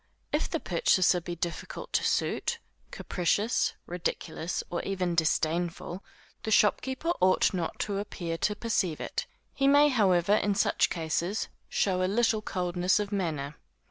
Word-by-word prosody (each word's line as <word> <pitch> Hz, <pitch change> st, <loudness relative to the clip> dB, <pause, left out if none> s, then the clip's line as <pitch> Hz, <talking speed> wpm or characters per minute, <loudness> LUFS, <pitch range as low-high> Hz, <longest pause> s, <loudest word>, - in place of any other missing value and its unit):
If -, -, +1 dB
the -, -, -1 dB
purchaser 185 Hz, -, +2 dB
be 175 Hz, +1 st, -5 dB
difficult 170 Hz, 0 st, -5 dB
to -, -, +2 dB
suit, -, -, 0 dB, 0.3 s
capricious, 205 Hz, +6 st, 0 dB
ridiculous, 175 Hz, -1 st, -3 dB
or 175 Hz, -, -1 dB
even 185 Hz, -3 st, -1 dB
disdainful, 170 Hz, +2 st, 0 dB, 0.4 s
the -, -, -4 dB
shopkeeper 260 Hz, +9 st, +2 dB
ought 185 Hz, +2 st, +4 dB
not 175 Hz, -3 st, -2 dB
to 200 Hz, -1 st, -1 dB
appear 170 Hz, -5 st, -4 dB
to 210 Hz, -, +1 dB
perceive 200 Hz, -8 st, -1 dB
it; -, -, -4 dB, 0.3 s
he 275 Hz, -, +1 dB
may 290 Hz, +1 st, +6 dB
however 195 Hz, -7 st, +3 dB
in 205 Hz, -1 st, +1 dB
such 200 Hz, -, +2 dB
cases, 170 Hz, +4 st, -2 dB, 0.2 s
show 185 Hz, -2 st, +1 dB
a 185 Hz, -, +1 dB
little 225 Hz, 0 st, +2 dB
coldness 180 Hz, -1 st, 0 dB
of 205 Hz, 0 st, -3 dB
manner. 155 Hz, -7 st, -2 dB
185 Hz, 140 wpm, -29 LUFS, 170-210 Hz, 0.4 s, may